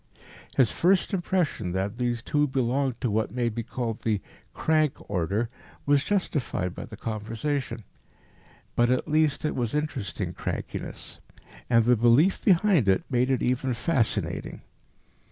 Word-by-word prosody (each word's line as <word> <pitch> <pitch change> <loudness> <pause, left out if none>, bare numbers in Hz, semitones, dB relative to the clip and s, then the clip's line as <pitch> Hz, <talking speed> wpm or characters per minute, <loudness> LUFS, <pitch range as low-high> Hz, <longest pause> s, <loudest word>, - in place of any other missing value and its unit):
His 125 -5 +5
first 190 +3 +2
impression 175 - 0
that 100 +5 -2
these 120 -2 -1
two 150 +2 +1
belonged 130 -1 0
to 120 - 0
what 110 +1 0
may 120 -1 -1
be 115 +1 -4
called 115 -1 -4
the 110 -3 0 0.3
"crank" 155 -3 +2
order 100 +4 0 0.4
was 145 -1 +3
justified 145 - -1
by - - -7
the 110 - -11
conversation. 115 +4 -3 0.9
But, 120 0 +3
at 130 0 +1
least, 155 -1 +2
it 150 - 0
was 120 0 -1
interesting 135 - -3
crankiness, - - -5 0.5
and 115 -2 +4
the 125 +1 +5
belief 120 - +4
behind 185 - +4
it 95 -1 +3
made 125 0 +2
it 130 - +1
even 125 0 0
fascinating. 130 -3 -1
125 Hz, 140 wpm, -26 LUFS, 115-150 Hz, 0.9 s, His